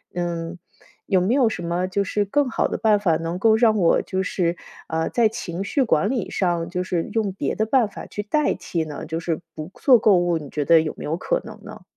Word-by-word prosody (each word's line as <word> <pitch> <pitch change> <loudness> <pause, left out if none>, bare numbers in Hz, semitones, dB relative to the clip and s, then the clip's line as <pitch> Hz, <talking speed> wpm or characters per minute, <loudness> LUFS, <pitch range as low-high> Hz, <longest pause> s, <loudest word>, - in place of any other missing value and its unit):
嗯， 175 0 -3 0.5
有 190 -3 +3
没 195 +6 +1
有 255 -4 +4
什 180 - -5
么 175 +2 -1
就 200 +2 0
是 205 +1 0
更 275 +7 +1
好 - - +1
的 - - -3
办 215 -1 +3
法 175 -5 +2
能 165 +2 -4
够 220 +2 +4
让 220 -1 +4
我 170 -3 +4
就 190 0 -2
是， 175 -2 -1 0.3
呃， 160 0 -1
在 235 -2 +3
情 195 -5 -5
绪 250 +8 0
管 205 -1 +1
理 240 -8 -2
上 170 -3 -1
就 180 +1 -2
是 175 -2 -2
用 215 -4 0
别 195 - -2
的 220 - 0
办 235 -1 +2
法 - - -9
去 205 - -5
代 300 +9 +1
替 165 -2 -3
呢， 150 -2 -7
就 160 +1 -3
是 165 -1 -3
不 155 +3 -7
做 255 -4 +7
购 210 -2 +4
物， 175 -1 +1
你 145 -3 -9
觉 150 -2 -2
得 165 +2 +6
有 155 -1 -3
没 - - -8
有 160 +2 -2
可 - - -1
能 - - -11
呢？ - - -11
185 Hz, 260 characters per minute, -22 LUFS, 170-220 Hz, 0.5 s, 做